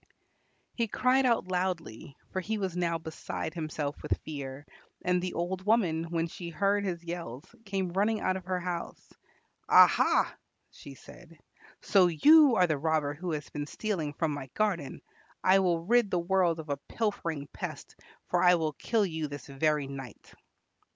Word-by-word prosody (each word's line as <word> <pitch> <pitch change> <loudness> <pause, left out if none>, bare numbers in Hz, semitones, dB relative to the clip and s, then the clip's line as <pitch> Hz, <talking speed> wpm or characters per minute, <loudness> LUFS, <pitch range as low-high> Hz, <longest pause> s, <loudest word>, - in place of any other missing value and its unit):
He 230 -1 -1
cried 255 +4 +2
out 230 -6 +1
loudly, 175 -9 -3
for 190 - -2
he 215 +4 -2
was 190 -4 -3
now 170 -2 0
beside 160 0 -6
himself 155 -3 -4
with - - -1
fear, 140 -2 -6 0.4
and 180 0 +1
the 180 0 -4
old 180 +2 -2
woman, 185 -7 +2
when 165 0 -1
she 170 +1 -7
heard 200 +5 +1
his 175 -3 -3
yells, 170 -6 -6 0.2
came 190 -3 -2
running 210 +3 +1
out 185 - 0
of 185 -1 -6
her 185 0 -1
house. 175 -1 -6 0.6
"Aha!" - - +5 0.4
she 140 - -12
said, 165 +4 -15 0.5
"so 190 -3 +5
you 285 - +6
are 185 - +5
the 155 -4 -1
robber 155 -1 0
who 175 +4 -5
has 145 -2 -4
been 145 -1 -4
stealing 170 -9 -3
from 160 0 -1
my 140 -2 -6
garden. 190 -10 -1 0.4
I 190 +1 +5
will 170 -3 +1
rid 235 0 +3
the 180 - 0
world 175 -1 +1
of 155 -1 -8
a 140 - -1
pilfering 165 -10 -2
pest, - - -7 0.3
for - - +1
I 180 0 +6
will 160 -2 -1
kill 220 - 0
you 160 -4 -3
this 145 -2 -8
very 150 +1 0
night." 135 -4 -9
170 Hz, 170 wpm, -29 LUFS, 155-190 Hz, 0.6 s, you